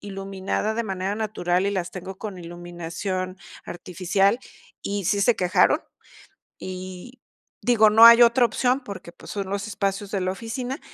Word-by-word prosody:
iluminada 195 +1 -3
de 235 - -1
manera 190 -1 -3
natural, 195 -4 -1
y - - +1
las 185 -3 -2
tengo 190 +1 -8
con 205 -4 -6
iluminación 175 +2 -5 0.3
artificial, 190 +4 0 0.4
y 200 -1 -3
sí 200 +2 +1
se 240 +4 +4
quejaron. 180 0 +3 0.8
Y, 185 +6 -8 0.4
digo, 230 -3 +5
no 220 +2 +8
hay 235 +1 +10
otra 235 +1 +5
opción 250 +3 +1
porque, 200 -8 -9
pues, - - -13
son 200 -2 -4
los 200 +1 -3
espacios 200 -1 -2
de 200 - -1
la 185 0 -1
oficina, 245 +6 -5
195 Hz, 155 wpm, -24 LUFS, 185-220 Hz, 0.8 s, hay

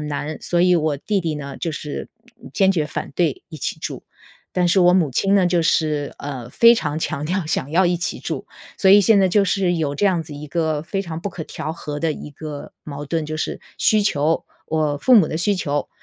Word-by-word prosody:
难。 150 +1 -4
所 175 -1 0
以 180 0 +5
我 155 -2 +1
弟 200 +2 -1
弟 160 -2 -1
呢， 140 -2 -6
就 165 -3 -3
是 150 -1 -6 0.3
嗯， - - -11
坚 195 -2 +3
决 165 -5 +1
反 - - -5
对 165 -6 0
一 160 - -9
起 - - -3
住， - - -5 0.5
但 180 -1 +2
是 190 - +3
我 180 0 +6
母 170 -7 +3
亲 195 +10 +1
呢 190 -3 +4
就 175 -1 +2
是， 150 -3 0
呃， 130 -4 -6
非 235 - +6
常 155 -7 -2
强 150 -2 -3
调 180 0 -1
想 145 -3 -2
要 180 +3 +3
一 175 0 +1
起 170 - -3
住。 - - -4 0.3
所 190 - +4
以 205 - +9
现 205 +1 +5
在 190 - +4
就 205 +2 +3
是 195 -2 +1
有 145 -3 -1
这 205 - -1
样 180 -4 +2
子 150 -1 -10
一 150 +1 -8
个 155 -1 -1
非 195 +4 -3
常 165 -4 -5
不 195 +4 -4
可 160 - -6
调 155 - -5
和 150 -3 -6
的 160 -1 0
一 150 - -8
个 145 0 -8
矛 145 -1 -7
盾， 160 0 -1
就 155 +1 -5
是 - - -3 0.2
需 215 -1 +3
求 155 -4 +1 0.2
我 155 -2 0
父 255 - +4
母 195 -8 +7
的 160 - -3
需 205 +3 +1
求， 145 -5 -2
160 Hz, 255 characters per minute, -21 LUFS, 150-185 Hz, 0.5 s, 以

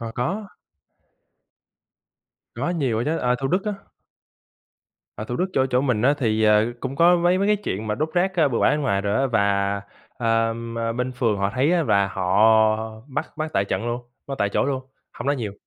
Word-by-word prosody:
À, 115 -1 -6
có. 195 - -2 2.1
Có 135 +8 -2
nhiều 135 -10 0
á 120 - -1
chớ, 160 +2 -1
à, 125 0 +1
Thủ 135 - -1
Đức 185 +3 0
á. 210 -1 -2 1.4
Ở 110 - -5
Thủ 120 +2 -4
Đức - - +1
chỗ 130 -5 +2
chỗ 125 -1 +1
mình 125 -6 0
á, 140 +4 +4
thì, 110 -4 +1
ờ, 105 +2 +4
cũng 130 +1 -5
có 175 +3 +5
mấy 175 +1 +2
mấy 200 - +1
cái 210 - +4
chuyện 110 - -4
mà 105 - -1
đốt 155 +7 -1
rác, 185 +2 +1
ơ, 155 -4 +4
bừa 120 - -1
bãi - - +4
bên 150 - 0
ngoài 115 -9 0
rồi 100 +1 -1
á 135 - +2
và, 100 -4 +1 0.4
ờ, 115 -1 +1 0.4
bên 125 +2 -3
phường 115 -4 0
họ 100 0 0
thấy 140 +6 +2
á, 175 -2 +2
là 100 -8 +2
họ 95 0 -1 0.7
bắt 135 -2 -4
bắt 155 0 -3
tại 95 - +2
trận 115 +3 -3
luôn, 120 +1 -2 0.3
bắt 140 - -4
tại 100 - +1
chỗ - - 0
luôn, 135 -1 -2 0.3
hông - - -7
nói 140 0 +2
nhiều. 110 -5 -4
125 Hz, 215 wpm, -23 LUFS, 110-150 Hz, 2.1 s, có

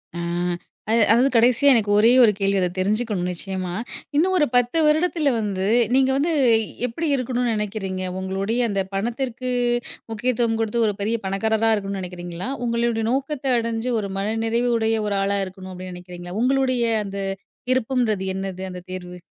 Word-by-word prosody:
ஆ - - -5 0.7
அது 230 - +4
அதாவது 245 +4 +4
கடைசியா, 245 +4 +5
எனக்கு 215 -3 +2
ஒரே 225 +3 +6
ஒரு 220 - +6
கேள்வி 195 -1 +1
அத 180 - +2
தெரிஞ்சுக்கணும் 205 -1 0
நிச்சயமா. 185 0 -5 0.4
இன்னும் 370 +5 +3
ஒரு 300 - +4
10 245 +5 +2
வருடத்தில 310 -1 +2
வந்து 195 -3 -2 0.3
நீங்க 265 0 +4
வந்து 310 +5 +1 0.6
எப்படி 325 +8 -3
இருக்கணும்ன்னு 245 -2 -1
நெனைக்கிறீங்க? 195 -3 -3 0.2
உங்களுடைய 195 +5 -2
அந்த 195 -1 0
பணத்திற்கு 240 +4 -2 0.6
முக்கியத்துவம் 230 0 0
குடுத்து, 225 +1 0
ஒரு 210 - 0
பெரிய 220 +3 0
பணக்காரரா 220 +3 +1
இருக்கணும்னு 195 -1 -4
நெனைக்கிறீங்களா? 175 +3 -6 0.2
"உங்களோட 235 -1 0
நோக்கத்த 270 0 -1
அடைஞ்சு 230 +1 -2
ஒரு 200 - -4
மனநிறைவு 225 +4 0
உடைய 225 0 +1
ஒரு 200 -1 0
ஆளா 200 0 0
இருக்கணும்." 185 0 -10
அப்படீன்னு 185 0 -8
நெனைக்கிறீங்களா? 180 0 -9
உங்களுடைய 255 -1 +2 0.2
அந்த 200 0 -5 0.5
விருப்பம்ன்றது 245 -5 +1
என்னது, 190 -1 -5
அந்த 180 - -7
தேர்வு? 180 -1 -7
225 Hz, 150 wpm, -22 LUFS, 195-245 Hz, 0.7 s, ஒரே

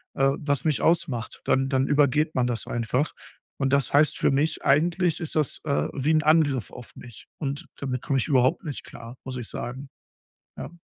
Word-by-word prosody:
äh, 135 0 +3
was 145 -4 -1
mich 155 -3 +1
ausmacht, 155 -8 0
dann 135 0 +2
dann 135 -1 +1
übergeht 150 +2 +2
man 125 -1 +2
das 120 -2 -2
einfach. 120 +5 -1 0.4
Und 135 -1 0
das 140 -3 +1
heißt 145 +1 +4
für - - +2
mich, 150 +4 0
eigentlich 165 +3 +2
ist 160 - -3
das, 155 -3 0
äh, 140 -2 0
wie 140 +2 0
'n 155 0 +3
Angriff 150 - +2
auf 125 - -11
mich 120 -3 -12
und 140 -1 -4
damit 130 -3 -3
komme 135 - 0
ich - - -1
überhaupt 130 -2 +2
nicht 145 -3 -5
klar, 115 +1 -11
muss 130 -1 -5
ich 120 -3 -4
sagen. 130 +4 -6 0.7
Ja. - - -6
140 Hz, 195 wpm, -25 LUFS, 125-150 Hz, 0.7 s, heißt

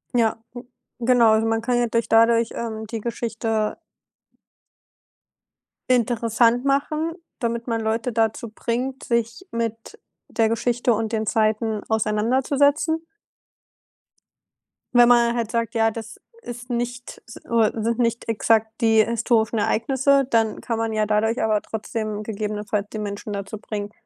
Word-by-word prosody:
Ja, 230 -2 +3 0.2
n 245 0 -9 0.4
genau. 240 -3 +5
Also 220 +1 +2
man 225 0 0
kann 245 +1 0
ja 240 - +2
durch 230 0 0
dadurch, 230 0 +4
ähm, 220 -2 -5
die 225 0 -4
Geschichte 225 -1 -2 2.1
Interessant 235 0 +2
machen, 305 +4 0 0.3
damit 235 -2 -2
man 230 -2 -1
Leute 225 +2 -1
dazu 225 0 0
bringt, 255 +4 -3
sich 235 - -2
mit 230 - -4 0.3
der 225 -1 +1
Geschichte 240 +1 +1
und 220 +1 -2
den 220 0 0
Zeiten 215 0 0
auseinanderzusetzen. 265 +9 +2 1.9
Wenn 240 0 +7
man 235 0 +4
halt 230 -2 -2
sagt: 230 0 -2
„Ja, 225 0 +3
das 220 0 -8 0.2
ist 245 - -9
nicht, 245 +1 -4
s 225 - -11
äh 230 -2 +1
sind 230 +2 -1
nicht 235 -1 0
exakt 225 0 +2
die 225 -1 +5
historischen 230 -1 +1
Ereignisse,“ 265 +6 +2
dann 225 -3 +1
kann 230 - -2
man 225 -1 -1
ja 215 0 +1
dadurch 220 +3 +1
aber 215 -1 +1
trotzdem 215 -1 -4
gegebenenfalls 210 -1 -3
die 215 - -5
Menschen 205 +1 -5
dazu 200 +1 -5
bringen, 205 -1 -5
230 Hz, 135 wpm, -23 LUFS, 220-240 Hz, 2.1 s, Wenn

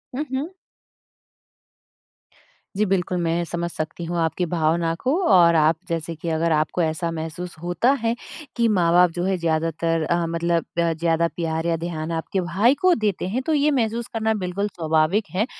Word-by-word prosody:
हुँ, 290 - -1
हुँ। 305 +8 -3 2.2
जी, 215 - +3
बिल्कुल। 180 -2 0
मैं 170 +1 0
समझ 170 0 -3
सकती 160 +2 -5
हूँ 170 +1 -3
आपकी 165 +2 0
भावना 165 0 +1
को 260 - +1 0.2
और 170 -2 +6
आप 160 +1 +4
जैसे 165 0 -3
कि 165 +2 -5
अगर 165 +1 0
आपको 155 +3 +1
ऐसा 165 +1 -1
महसूस 165 +2 -6
होता 175 +9 +2
है 230 0 0 0.4
कि 235 -1 +2
माँ-बाप 175 0 +4
जो 175 - -2
है 190 -1 +1
ज़्यादातर 165 0 0
अ, 170 +1 0
मतलब 170 0 0
अ, 170 -1 +2
ज़्यादा 165 +1 +1
प्यार 160 -1 -2
या 165 - +1
ध्यान 160 -1 -4
आपके 165 +3 -2
भाई 195 +9 +3
को 370 -1 +5
देते 195 -3 -1
हैं 235 +8 -1
तो 320 - +1
ये 295 +1 +3
महसूस 235 -2 -1
करना 220 -1 +1
बिल्कुल 195 +3 -1
स्वाभाविक 160 +5 +1
है। 215 +4 +2
170 Hz, 175 wpm, -23 LUFS, 165-195 Hz, 2.2 s, और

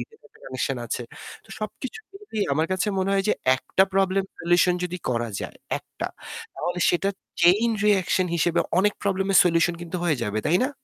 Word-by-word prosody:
একটা - - -22
connection 130 +1 -2
আছে। 120 +1 -3 0.4
তো - - -23
সবকিছু 245 - -6
মিলিয়ে 390 - -4
আমার 160 +3 +1
কাছে 185 +3 0
মনে 190 +1 0
হয় 195 0 +2
যে - - +5 0.2
একটা 190 +8 +2
প্রব্লেম 195 0 +2 0.2
solution 175 +1 +3
যদি 180 0 -3
করা 120 -1 -1
যায়, - - -7 0.2
একটা। - - -6 0.5
তাহলে 175 0 -3
সেটা 195 +3 +1 0.3
chain 195 +7 +5 0.2
reaction 190 -2 +3
হিসেবে 170 +1 +2 0.2
অনেক 205 +1 +3
প্রব্লেমের 195 -1 +2
solution 170 0 +3
কিন্তু 175 +1 -5
হয়ে 155 -6 +1
যাবে, 105 0 -1
তাই 170 +4 +4
না? - - -2
180 Hz, 170 wpm, -24 LUFS, 165-195 Hz, 0.5 s, যে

